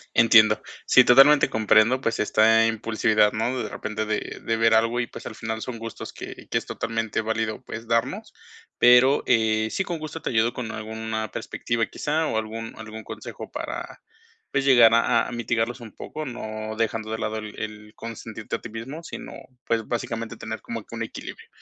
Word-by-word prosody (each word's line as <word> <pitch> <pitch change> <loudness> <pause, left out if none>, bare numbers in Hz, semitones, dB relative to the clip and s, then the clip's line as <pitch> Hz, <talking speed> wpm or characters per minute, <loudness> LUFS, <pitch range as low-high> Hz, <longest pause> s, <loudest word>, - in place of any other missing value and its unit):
Entiendo. 110 -2 +6 0.3
Sí, 130 - +7
totalmente 135 +4 +7
comprendo, 110 +4 +4
pues, 115 - -1
está 110 +1 +4
impulsividad, 110 -1 +2
¿no? 120 +4 -1
De - - -5
repente 110 0 -4
de 105 0 -3
de 115 0 0
ver 115 0 +4
algo 115 +2 +3
y 120 - -1
pues - - -11
al 110 - -8
final 110 0 -4
son 125 -2 -5
gustos 115 0 -7
que - - -9
que - - +1
es - - -2
totalmente 115 -1 -2
válido, 110 0 -2
pues, 115 0 -8
darnos, 115 0 -1 0.5
pero, 125 +3 +6
eh, 110 -2 +3
sí, 195 - -1
con 170 -4 -4
gusto 155 +1 -6
te - - -2
ayudo 115 +1 +2
con 115 -3 -5
alguna 110 0 -4
perspectiva, 115 -1 -2
quizá, 155 +7 -1
o 110 - -1
algún 115 +1 -4
algún 110 0 -8
consejo - - -8
para - - -6 0.5
pues, 135 0 0
llegar 120 -4 +7
a 115 0 +3
a - - -5
a - - -7
mitigarlos 120 +1 -1
un 110 - -10
poco, 155 - -7
no 110 -4 -5
dejando 110 -1 -1
de 110 - -2
lado 110 0 -2
el 110 -1 -7
el 105 0 -7
consentirte 110 -1 -6
a - - -6
ti - - -8
mismo, 125 +9 -7
sino, - - -8 0.3
pues, 115 -1 0
básicamente 115 -1 -4
tener 110 0 -6
como 115 -2 -6
que 115 - -10
un 115 - -3
equilibrio, 115 - -8
115 Hz, 190 wpm, -24 LUFS, 110-120 Hz, 0.5 s, Sí